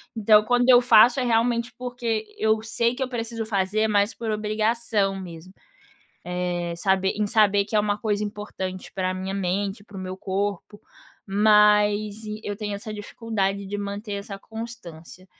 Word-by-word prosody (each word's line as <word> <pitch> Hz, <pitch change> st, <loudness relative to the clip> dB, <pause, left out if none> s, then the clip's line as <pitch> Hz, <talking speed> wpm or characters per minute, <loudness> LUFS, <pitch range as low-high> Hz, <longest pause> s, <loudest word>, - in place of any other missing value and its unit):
Então 215 Hz, -1 st, +5 dB
quando 245 Hz, +2 st, +2 dB
eu 245 Hz, -1 st, +8 dB
faço 240 Hz, +1 st, +6 dB
é 255 Hz, -, 0 dB
realmente, 235 Hz, 0 st, +1 dB
porque 245 Hz, -3 st, -3 dB
eu 220 Hz, 0 st, +2 dB
sei 235 Hz, +2 st, 0 dB
que 265 Hz, -, -2 dB
eu 255 Hz, -, -4 dB
preciso 230 Hz, -2 st, -4 dB
fazer, 210 Hz, +1 st, 0 dB
mas 205 Hz, 0 st, +2 dB
por 225 Hz, -2 st, -3 dB
obrigação 215 Hz, -1 st, 0 dB
mesmo. 180 Hz, 0 st, -10 dB, 0.7 s
Eh, 175 Hz, -1 st, -2 dB
saber 190 Hz, +1 st, +1 dB
em 210 Hz, 0 st, 0 dB
saber 205 Hz, -1 st, +3 dB
que 215 Hz, -, -9 dB
é 210 Hz, -, +5 dB
uma 210 Hz, 0 st, -1 dB
coisa 210 Hz, -1 st, -1 dB
importante 205 Hz, -3 st, -6 dB
pra 185 Hz, -1 st, -1 dB
minha 190 Hz, +1 st, -4 dB
mente, 195 Hz, +2 st, -2 dB
para 205 Hz, -1 st, -13 dB
o -, -, -5 dB
meu 185 Hz, 0 st, -5 dB
corpo, 200 Hz, +1 st, -3 dB, 0.5 s
mas 210 Hz, 0 st, +4 dB, 0.3 s
eu 205 Hz, -1 st, -4 dB
tenho 205 Hz, -2 st, -4 dB
essa 215 Hz, +1 st, -7 dB
dificuldade 205 Hz, -2 st, -3 dB
de 205 Hz, +2 st, -4 dB
manter 205 Hz, +1 st, -5 dB
essa 200 Hz, 0 st, -6 dB
constância. 195 Hz, -6 st, -10 dB
210 Hz, 165 wpm, -24 LUFS, 195-225 Hz, 0.7 s, eu